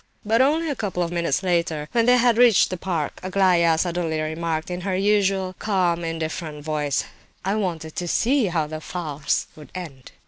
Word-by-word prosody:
But 225 +3 +3
only 310 +5 +2
a 290 - -1
couple 190 -6 -2
of 170 - -3
minutes 170 -1 0
later, 170 -4 0
when 230 0 +2
they 250 0 +6
had 240 -1 +4
reached 240 -7 +5
the - - -1
park, 170 -4 -3
Aglaya 180 -3 +3
suddenly 170 -2 -1
remarked, 160 +2 -2
in 180 0 -4
her 190 0 -1
usual 195 -1 +1
calm, 180 -5 +1
indifferent 160 -2 -4
voice: 150 -3 0 0.4
"I 195 - +1
wanted 170 -7 -3
to 175 - -2
see 250 +5 +2
how 165 -3 0
the 155 +1 -7
farce 155 -4 -2
would 150 - -13
end." 150 -8 -8
175 Hz, 180 wpm, -23 LUFS, 160-195 Hz, 0.4 s, they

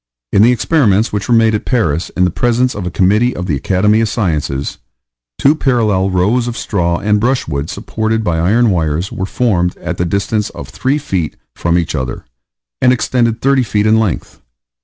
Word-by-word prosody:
In 100 - +4
the 115 +3 +6
experiments 115 - +2
which 105 +2 -3
were 120 - +4
made 115 -1 +4
at 105 - -1
Paris 85 - 0
in 90 - +3
the 90 - 0
presence 120 +5 +1
of 95 -3 -5
a - - -1
committee 105 +8 +2
of 90 - -4
the 80 -6 -1
Academy 100 +9 +2
of 110 - 0
Sciences, 75 - -2 0.6
two 140 - +4
parallel 110 -10 +1
rows 105 +7 +1
of 120 0 -4
straw 85 -4 -1
and 105 +2 +1
brushwood 105 - -1
supported 110 0 -2
by 85 -5 0
iron 110 +7 +3
wires, 80 0 -1
were 95 - -4
formed 95 -7 0
at - - -5
the 90 - +1
distance 100 +4 -1
of - - -9
3 135 +3 -1
feet 95 - -3 0.2
from 85 0 0
each 85 -2 -1
other, 65 -5 -4 0.6
and 125 - +5
extended 120 -2 0
30 135 0 +3
feet 105 -3 0
in 110 +1 +4
length. 110 -6 -3
105 Hz, 190 wpm, -15 LUFS, 90-120 Hz, 0.6 s, the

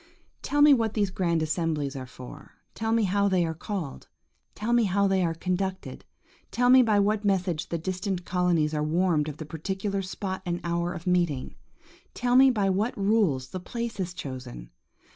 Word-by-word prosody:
Tell 290 0 +2
me 295 -1 +8
what 225 -4 0
these 205 -3 +1
grand 170 -4 0
assemblies 155 -3 -1
are 130 -1 -6
for; 130 +3 -12 0.2
tell 225 0 -2
me 230 -1 +3
how 200 +1 +2
they 185 -3 +2
are 160 - -2
called; 170 -3 -6 0.5
tell 225 +3 -1
me 240 -2 +4
how 200 +1 +2
they 190 -1 +2
are 165 -1 0
conducted; 185 +2 -3 0.4
tell 245 0 +2
me 260 0 +8
by 215 -4 +3
what 210 +1 +1
message 185 -5 0
the 170 - -1
distant 185 +1 -3
colonies 175 -4 +1
are 150 - -1
warned 160 0 +1
of 150 - -8
the 155 - -7
particular 190 +5 -3
spot 190 0 -5
and 175 -1 -2
hour 170 0 -1
of 175 -2 -7
meeting. 175 -7 0 0.6
Tell 245 0 +1
me 265 +1 +8
by 210 -6 +1
what 200 +5 0
rules 195 -11 +1
the 185 - -5
place 235 +3 -5
is 180 -1 -3
chosen. 125 - -8
185 Hz, 185 wpm, -27 LUFS, 165-205 Hz, 0.6 s, me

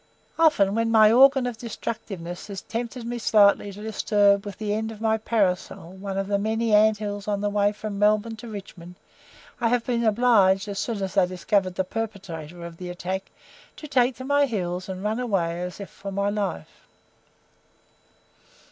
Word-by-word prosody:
Often 290 -12 +4
when 230 +1 +1
my 220 -1 +6
organ 265 +2 +6
of 240 -2 -4
destructiveness 195 -6 -6
has 200 -2 -7
tempted 235 +1 -5
me 240 +1 -4
slightly 205 -2 +4
to 205 +2 -10
disturb 205 -2 +2
with 195 -2 -7
the 210 -1 -2
end 220 +1 -2
of 215 - -10
my 220 0 +1
parasol 190 -6 -1
one 195 0 -5
of 195 - -1
the 200 0 0
many 220 +1 0
ant 215 0 +5
hills 205 -1 -5
on 205 -1 0
the 205 0 -1
way 205 0 +2
from 210 -1 -6
Melbourne 215 +2 +2
to 235 - -10
Richmond, 190 -4 -9 0.6
I 240 - +1
have 235 0 +1
been 235 -2 0
obliged, 210 -4 +3
as 200 -1 -4
soon 220 -5 -2
as 190 - -4
they 190 -3 +3
discovered 185 +1 0
the 190 - 0
perpetrator 180 -6 -6
of 170 -1 -9
the 180 0 -7
attack, 185 +2 -4 0.5
to 305 - -9
take 255 -3 +2
to 260 - -8
my 285 +1 +3
heels 185 -5 -3
and 190 0 -5
run 215 +3 -1
away 175 -8 -1
as 180 +2 -6
if 200 - -8
for 200 0 -8
my 200 +1 0
life. 200 - -4
205 Hz, 185 wpm, -25 LUFS, 190-225 Hz, 0.6 s, my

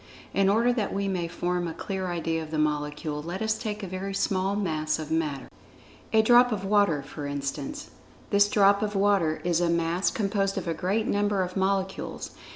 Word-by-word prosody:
In 195 0 +3
order 230 +4 +3
that 220 -5 -1
we 200 0 -1
may 180 -3 -1
form 175 +1 -2
a 165 - -5
clear 190 -2 -4
idea 165 -2 -1
of 160 - -7
the 155 - -3
Molecule, 150 0 -1
let[Pg 175 +4 -5
67] - - 0
us 220 0 +1
take 210 -3 -4
a - - -3
very 190 +2 -4
small 195 0 0
Mass 155 -6 -1
of 155 -1 -6
Matter—a 160 - -3
drop 245 +2 +6
of 200 -3 -2
water, 195 -8 +3
for 145 +1 -7
instance. 145 - -4 0.4
This 205 0 +5
drop 200 -1 +4
of 210 -1 -2
water 195 -6 +2
is 175 -1 +1
a 175 - +2
Mass 170 +2 +1
composed 195 -2 -1
of - - -3
a 165 - 0
great 200 +6 -1
number 205 -2 +1
of 180 0 -6
molecules. 190 0 -2
190 Hz, 195 wpm, -27 LUFS, 165-205 Hz, 0.4 s, drop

